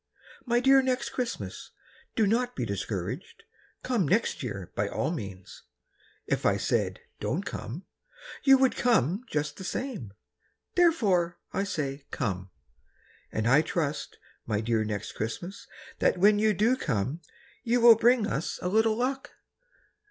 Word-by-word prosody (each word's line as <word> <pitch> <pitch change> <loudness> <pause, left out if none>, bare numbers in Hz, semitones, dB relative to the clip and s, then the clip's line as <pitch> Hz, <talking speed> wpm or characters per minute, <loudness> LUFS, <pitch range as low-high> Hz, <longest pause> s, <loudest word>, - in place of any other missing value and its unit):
My 240 0 +3
dear 270 +2 +6
Next 255 0 -1
Christmas, 170 - -5 0.4
Do 220 - +3
not 245 +4 +1
be 125 - -2
discouraged, 100 - -4 0.4
Come 235 - +1
next 215 +9 +1
year 100 -8 -5
by 100 - 0
all 155 - -1
means; 95 - -7 0.6
If - - -1
I - - +3
said - - -1 0.2
"Don't - - -1
come" 145 - -6 0.6
You 270 -1 +7
would 265 -1 +3
come 215 - +2
just 150 -1 -2
the - - -7
same. 195 - -4 0.6
Therefore, 200 - +3 0.2
I 195 +1 0
say 140 -7 -4
"Come," 95 -1 -3 0.8
And 110 +1 -1
I 135 +5 +6
trust, 155 -2 -3 0.3
my 105 -1 0
dear 110 0 +1
Next 105 -1 -4
Christmas, 170 - -5 0.3
That - - +3
when 205 +3 +5
you 215 -1 +3
do 225 +7 +3
come 135 - -2 0.4
You 245 0 +1
will 235 -1 +9
bring 235 0 +4
us 155 -6 -2
a 180 - 0
little 220 +2 +3
luck. 265 +2 -2
180 Hz, 145 wpm, -28 LUFS, -, 0.8 s, will